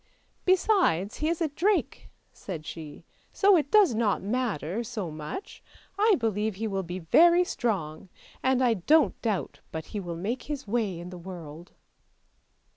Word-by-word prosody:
" - - -42
Besides 365 - +2
he 310 - 0
is 335 0 -2
a 325 - +2
drake," 375 +8 -1 0.2
said 165 -6 -7
she; 155 -3 -8
" - - -35
so 400 -1 +5
it 300 -4 +1
does 410 - +5
not 220 -4 0
matter 215 - -2
so 215 -7 -5
much. 155 - -7 0.3
I 420 +1 +4
believe 215 -3 -1
he 220 +4 -4
will 195 -2 -1
be 175 0 -6
very 340 - +5
strong, 190 - -3 0.3
and 260 0 +2
I 240 -2 +4
don't 290 - +2
doubt 215 -5 -2
but 160 0 -5
he 210 - -2
will 175 -3 -5
make 220 +9 -3
his 290 -2 -5
way 210 -5 -1
in 175 +1 -8
the 180 - -8
world." 170 -2 -10
215 Hz, 170 wpm, -27 LUFS, 175-295 Hz, 0.3 s, so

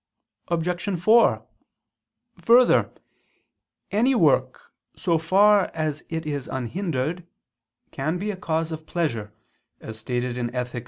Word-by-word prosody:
Obj. 175 +2 -2
4: 225 +7 +4 0.9
Further, 240 +2 +4 1.0
any 240 +6 +2
work, - - +1 0.2
so 170 -3 0
far 195 +4 +4
as 155 -2 -3
it 160 0 -4
is 145 -3 -4
unhindered, 155 - -3 0.7
can 155 +6 -2
be 205 +3 -3
a - - -6
cause 165 -3 -2
of 155 0 -7
pleasure, 115 -12 -2 0.5
as 110 0 -9
stated 125 +2 -3
in 120 -1 -2
_Ethic. 125 -1 -3
160 Hz, 115 wpm, -24 LUFS, 130-185 Hz, 1.0 s, 4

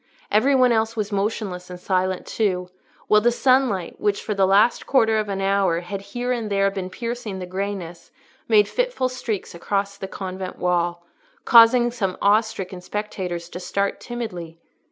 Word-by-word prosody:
Every 265 +6 +4
one 255 -2 +5
else 225 0 +1
was 215 -1 -3
motionless 195 -3 -2
and 180 0 -8
silent 185 0 -1
too, 180 -4 -1 0.4
while 210 0 +5
the 240 +2 +3
sunlight, 250 -8 +1
which 205 -1 0
for 215 - -2
the 195 -1 +2
last 205 +5 +3
quarter 225 -5 +3
of 210 -1 -3
an 195 -1 -2
hour 195 -3 +1
had 195 +3 -6
here 245 +5 -4
and 230 -4 -2
there 195 -1 +2
been 190 -2 -5
piercing 230 -2 -5
the 185 - -5
greyness, 185 -2 -5 0.4
made 210 -3 +5
fitful - - -1
streaks 230 -5 -4
across 200 +3 -2
the 195 - -6
convent 185 -1 -6
wall, 175 -1 0 0.4
causing 240 0 +7
some 195 -6 -2
awe 205 +2 +5
stricken 190 -4 -7
spectators 185 -3 -4
to 180 - -7
start 200 +2 -2
timidly. 180 -9 -6
200 Hz, 170 wpm, -23 LUFS, 185-225 Hz, 0.4 s, causing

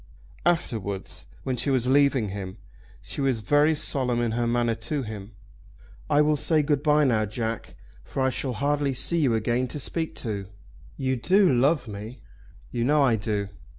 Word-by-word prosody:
Afterwards, 110 - -2 0.2
when 130 -1 -2
she 140 - -1
was 130 -3 +2
leaving 135 -4 +3
him, 95 -1 -6 0.5
she - - -4
was 130 -5 +1
very 145 +7 +3
solemn 130 -5 +1
in 120 -1 0
her 120 +1 0
manner 120 0 +1
to 145 +4 -3
him. 105 -1 -8 0.8
"I 150 - +5
will 150 0 +3
say 155 +1 +3
good 145 -1 +1
bye 150 0 +4
now, 115 -6 +2
Jack, 115 +1 -4 0.3
for 135 - -3
I 130 - +2
shall 130 0 -3
hardly 140 +3 0
see 170 +7 +1
you 130 -7 +3
again 120 +3 0
to 145 - -6
speak 160 +3 -2
to. 100 -4 -3 0.5
You 130 -1 0
do 185 - +4
love 135 +2 +2
me?" 105 +3 -8 0.5
"You 120 - -1
know 145 +3 +4
I 125 -4 +4
do." 105 -2 -2
125 Hz, 175 wpm, -26 LUFS, 110-145 Hz, 0.8 s, I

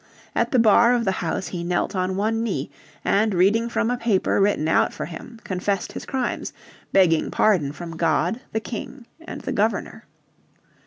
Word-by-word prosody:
At - - +1
the 255 - +3
bar 235 +2 +5
of 235 -1 0
the 190 - +2
House 170 +2 -2
he 175 -2 -4
knelt 175 +3 -1
on 185 0 -1
one 220 +3 0
knee, 230 - -3 0.3
and 210 0 +2
reading 210 +6 +3
from 230 0 0
a 245 - 0
paper 220 -4 +1
written 195 -6 +2
out 160 - +3
for - - -5
him 225 +7 -10
confessed 195 +1 -2
his - - -8
crimes, 260 -3 -2 0.4
begging 170 -5 +3
pardon 175 -10 +2
from 165 +2 -8
God, 170 +6 +1
the 220 - 0
King, 240 +3 -7 0.2
and - - -7
the - - -4
Governor. - - -1
200 Hz, 175 wpm, -23 LUFS, 175-230 Hz, 0.4 s, bar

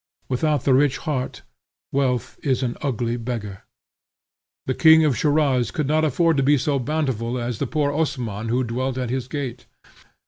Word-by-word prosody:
Without 145 +2 0
the 135 - +3
rich 135 0 +3
heart, 135 -4 -4 0.5
wealth 130 -3 -1
is 130 -2 0
an 120 -1 -2
ugly 120 -4 -1
beggar. 110 -5 -5 1.0
The 130 - 0
king 160 +2 +6
of 145 -4 +2
Schiraz 145 -4 +2
could 155 -4 -2
not 155 +3 +2
afford 160 +2 +2
to - - +3
be 145 +2 +4
so 140 +1 0
bountiful 125 -4 -1
as 120 -2 -3
the - - -1
poor 150 -2 0
Osman 120 -8 -2
who 125 +3 +1
dwelt 130 +2 -2
at 125 -2 -2
his 130 -1 -2
gate. 130 -4 -5
130 Hz, 170 wpm, -23 LUFS, 120-145 Hz, 1.0 s, king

